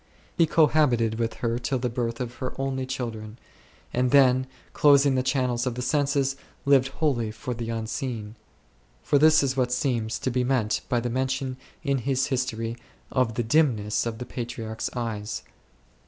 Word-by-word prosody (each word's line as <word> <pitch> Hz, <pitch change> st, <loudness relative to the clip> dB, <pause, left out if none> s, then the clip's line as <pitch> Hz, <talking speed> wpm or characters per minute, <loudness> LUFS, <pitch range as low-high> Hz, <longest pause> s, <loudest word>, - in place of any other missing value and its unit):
He 165 Hz, -, +4 dB
cohabited 135 Hz, -8 st, +3 dB
with 115 Hz, -1 st, -1 dB
her 115 Hz, +1 st, 0 dB
till 130 Hz, +2 st, -1 dB
the 125 Hz, 0 st, -1 dB
birth 115 Hz, -1 st, -3 dB
of 125 Hz, -1 st, -4 dB
her 130 Hz, -, -4 dB
only 135 Hz, -1 st, -2 dB
children5, 115 Hz, -5 st, -5 dB, 0.6 s
and 125 Hz, +1 st, +2 dB
then, 130 Hz, -1 st, +5 dB, 0.3 s
closing 140 Hz, -1 st, +5 dB
the 130 Hz, -, +2 dB
channels 130 Hz, -1 st, 0 dB
of 125 Hz, -, -2 dB
the 125 Hz, -, -3 dB
senses, 140 Hz, 0 st, +1 dB, 0.3 s
lived 135 Hz, -2 st, +5 dB
wholly 135 Hz, -5 st, 0 dB
for 110 Hz, +3 st, -5 dB
the 115 Hz, -1 st, -5 dB
Unseen; 115 Hz, -1 st, -4 dB, 0.7 s
for 145 Hz, -2 st, +3 dB
this 155 Hz, 0 st, +6 dB
is 130 Hz, -1 st, 0 dB
what 125 Hz, -2 st, +1 dB
seems 125 Hz, -3 st, 0 dB
to 130 Hz, -, -2 dB
be 125 Hz, +1 st, +1 dB
meant 125 Hz, -4 st, +1 dB
by 120 Hz, -, +2 dB
the 120 Hz, 0 st, -2 dB
mention 130 Hz, +1 st, -1 dB, 0.3 s
in 140 Hz, -3 st, +1 dB
his 135 Hz, +1 st, 0 dB
•history 115 Hz, -3 st, -2 dB, 0.3 s
of 125 Hz, -4 st, +1 dB
the 120 Hz, -, 0 dB
dimness 115 Hz, -5 st, +2 dB
of 115 Hz, -1 st, -4 dB
the 125 Hz, -, -6 dB
Patriarch's 115 Hz, -3 st, -5 dB
eyes. 110 Hz, -3 st, -3 dB
125 Hz, 170 wpm, -26 LUFS, 115-135 Hz, 0.7 s, this